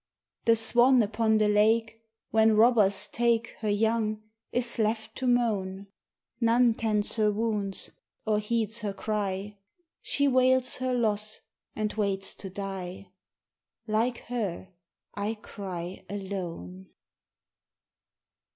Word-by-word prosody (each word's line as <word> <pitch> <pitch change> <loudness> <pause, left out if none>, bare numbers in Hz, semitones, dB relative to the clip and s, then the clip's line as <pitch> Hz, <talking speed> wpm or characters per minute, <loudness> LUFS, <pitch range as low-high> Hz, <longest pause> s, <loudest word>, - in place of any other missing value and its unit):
The 230 - +5
swan 240 +3 +5
upon 220 +1 +1
the 215 -1 +3
lake 225 +2 +2 0.3
When 220 0 +4
robbers 210 -4 +4
take 235 -1 +1
Her 215 - -2
young, 215 0 0 0.3
is 240 -1 0
left 220 0 -1
to 260 - -2
moan; 200 -5 0 0.5
None 235 0 +4
tends 215 -1 0
her 210 -1 +3
wounds 210 -2 -2 0.3
or 215 -1 +2
heeds 220 +1 -1
her 205 -2 -3
cry, 205 -1 -3 0.4
She 285 0 0
wails 255 -1 +3
her 255 0 -1
loss 215 -2 -1 0.3
and 215 -1 -2
waits 195 -2 0
to 195 - -7
die: 190 -1 -6 0.8
Like 230 +3 0
her 205 -7 -4 0.4
I 205 +2 -2
cry 190 -4 -7
alone. 175 - -6
215 Hz, 115 wpm, -28 LUFS, 200-230 Hz, 0.8 s, The